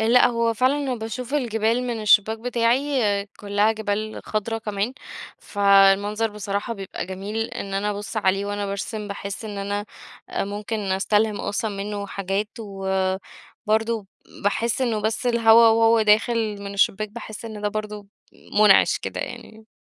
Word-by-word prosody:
لأ 235 +3 +5
هو 230 -1 0
فعلًا 265 +3 +1
باشوف 240 +4 -5
الجبال 230 -3 +1
من 240 -3 -3
الشبّاك 215 +1 +4
بتاعي، 235 -3 +1
كلها 205 +1 +1
جبال 215 0 -3
خضرا 220 +1 -2
كمان، 210 +1 -2 0.5
فالمنظر 200 +2 +3
بصراحة 205 +1 -3
بيبقى 195 -4 -6
جميل، 195 +3 -6
إن 195 -1 -5
أنا 205 +2 0
أبُص 205 0 -6
عليه 195 -1 +1
وأنا 205 0 -3
بارسم 205 +2 -4
باحس 200 +1 -6
إن 205 -2 -6
أنا 205 +1 -2 0.5
ممكن 205 +2 -3
أستلهم 205 +2 +1
أصلًا 205 +2 -2
منه 200 0 -4
حاجات، 195 +1 -2
وبرضه 195 +2 -2 0.4
باحس 230 +4 0
إنه 230 -4 0
بس 220 +4 -1
الهوا 230 -1 +6
وهو 225 0 +4
داخل 215 -1 +2
من 200 0 -6
الشبّاك 210 +1 +1
باحس 215 0 -9
إن 220 -2 -7
ده 210 - +1
برضه 210 -1 -5 0.5
مُنعش 210 -2 +6
كده - - -5
يعني. 220 0 -8
210 Hz, 140 wpm, -23 LUFS, 200-225 Hz, 0.5 s, الهوا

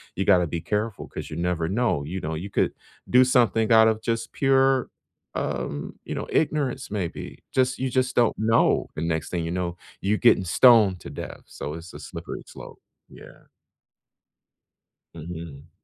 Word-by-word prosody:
you 95 - -1
gotta 90 -4 +4
be 85 +1 -3
careful 105 +3 -2
'cause - - -7
you 75 - -6
never 85 -2 -1
know. 110 -9 0
You 90 +5 -4
know, 80 +1 -3
you 95 +6 -5
could - - +1 0.4
do 125 +1 +7
something 115 -3 +3
out 110 0 +7
of 110 0 +1
just 115 0 -2
pure, 135 -1 +3 0.5
um, 70 0 -3
you - - -4
know, - - -3
ignorance, 150 -4 0
maybe. 95 -6 -4
Just 130 0 +2
you 130 0 -1
just 130 0 0
don't 120 -2 +3
know. 115 +1 +3
The 75 - -4
next 80 -1 -2
thing 85 -2 -2
you 85 - -3
know, 90 -1 -3 0.2
you're 105 +2 +1
getting 120 -5 +4
stoned 105 -2 +5
to - - -8
death, - - -7
so 75 - -6
it's 85 +1 -10
a - - -9
slippery - - -7
slope. - - -11 0.3
Yeah. - - -15 1.7
Mhm. 80 -3 -9
100 Hz, 170 wpm, -25 LUFS, 85-120 Hz, 1.7 s, do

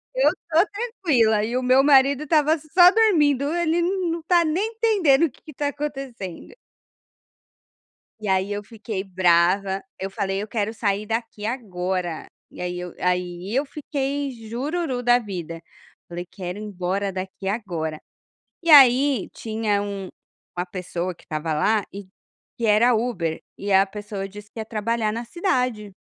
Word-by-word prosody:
"eu - - +4 0.2
tô 330 +3 +4
tranquila", 310 - +1
e 235 +3 -3
o 255 - -1
meu 255 +2 +5
marido 280 0 +5
estava 305 +1 +3
só 350 +4 +6
dormindo, 305 - +3
"Ele 340 -1 +1
n 365 0 0
não 335 0 -3
tá 345 +1 +4
nem 335 +7 0
entendendo 390 - +3
o 315 - -3
que - - -24
que 310 - -12
está 290 +1 -2
acontecendo". 270 - -6 1.7
E 215 - -6
aí 190 +1 +1
eu 205 0 -3
fiquei 215 -3 -5
brava, 185 +1 +2 0.2
eu 190 - -3
falei: 195 0 -2
"Eu 210 - -5
quero 215 0 -2
sair 205 -2 -1
daqui 225 -1 -4
agora!", 185 -7 -3 0.2
e - - -10
aí 180 0 -3
eu 180 -1 -7
aí 180 +2 -2
eu 275 +3 +2
fiquei 280 -1 -3 0.2
"jururu 265 +2 -2
da 245 0 +5
vida", 175 -6 -6 0.5
falei: 175 +1 -6
"Quero 180 -1 -6
ir - - -7
embora 195 -1 -2
daqui 190 +1 -6
agora!". 170 -8 -3 0.6
E 335 - -3
aí 270 -4 +7
tinha 220 -2 -1
um 200 -2 -5 0.5
uma 180 - -1
pessoa 180 -1 -4
que - - -22
estava 155 0 -3
lá 210 +8 +2
e 200 -1 -8 0.5
que 235 - -1
era 225 +3 +5
Uber, 190 -9 -2 0.2
e 200 0 -4
a 190 +1 +6
pessoa 200 -1 -6
disse 210 +1 -12
que - - -9
ia 220 - -4
trabalhar 220 0 -1
na 230 +2 -4
cidade, 250 - -1
220 Hz, 160 wpm, -23 LUFS, 190-280 Hz, 1.7 s, aí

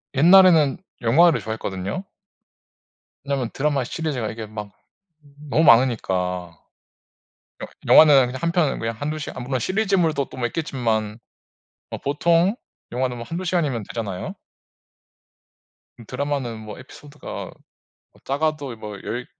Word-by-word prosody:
옛날에는 165 -1 +6 0.2
영화를 160 +8 +4
좋아했거든요. 105 - -4 1.2
왜냐하면 135 -4 -2
드라마의 140 -2 0
시리즈가 140 -10 -3
이게 110 -1 -7
막 105 -1 -7 0.8
너무 160 +4 +3
많으니까. 95 - +2 1.1
영 - - -5 0.2
영화는 145 -5 +7
그냥 130 +1 -6
한 170 - 0
편은 170 -6 +1
그냥 115 0 -3
1, 145 +5 -3
2 155 - -5
시간 145 - -7
아 - - -6
물론 130 0 -1
시리즈물도 185 - 0
또 - - -11
뭐 120 - 0
있겠지만 115 -7 -2 0.7
뭐 - - -6
보통 170 +7 +2 0.4
영화는 125 0 -1
뭐 120 - -7
1, 165 - -4
2 185 - -5
시간이면 150 - -1
되잖아요. 100 -6 -5 1.6
음 115 - -12
드라마는 130 -3 -3
뭐 105 -1 -9
에피소드가 145 +3 -9 0.7
뭐 - - -24
작아도 145 -2 -2
뭐 105 -2 -8
10 120 +3 -4
130 Hz, 285 characters per minute, -22 LUFS, 115-155 Hz, 1.6 s, 영화는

